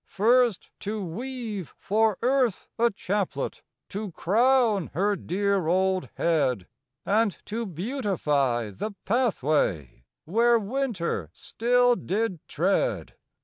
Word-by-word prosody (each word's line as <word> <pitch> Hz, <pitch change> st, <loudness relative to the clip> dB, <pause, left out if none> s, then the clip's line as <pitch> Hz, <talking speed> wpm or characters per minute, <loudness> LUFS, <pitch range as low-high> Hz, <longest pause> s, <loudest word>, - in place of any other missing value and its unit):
First 235 Hz, +1 st, +2 dB
to 210 Hz, -1 st, -3 dB
weave 225 Hz, -, -5 dB
for 215 Hz, 0 st, +1 dB
Earth 250 Hz, -5 st, +1 dB
a 235 Hz, +1 st, +5 dB
chaplet 200 Hz, -1 st, -3 dB, 0.3 s
To 205 Hz, 0 st, -5 dB
crown 225 Hz, -, +2 dB
her 200 Hz, +4 st, +2 dB
dear 195 Hz, 0 st, 0 dB
old 185 Hz, +1 st, +1 dB
head; 130 Hz, -, +1 dB, 0.4 s
And 210 Hz, 0 st, +2 dB
to 225 Hz, +1 st, -3 dB
beautify 155 Hz, -, -1 dB
the 200 Hz, -, -5 dB
pathway 150 Hz, -, 0 dB, 0.2 s
Where 235 Hz, +7 st, +4 dB
winter 205 Hz, -, -2 dB
still 245 Hz, +1 st, +2 dB
did 205 Hz, -4 st, -2 dB
tread. 195 Hz, -, 0 dB
205 Hz, 105 wpm, -26 LUFS, 175-235 Hz, 0.4 s, a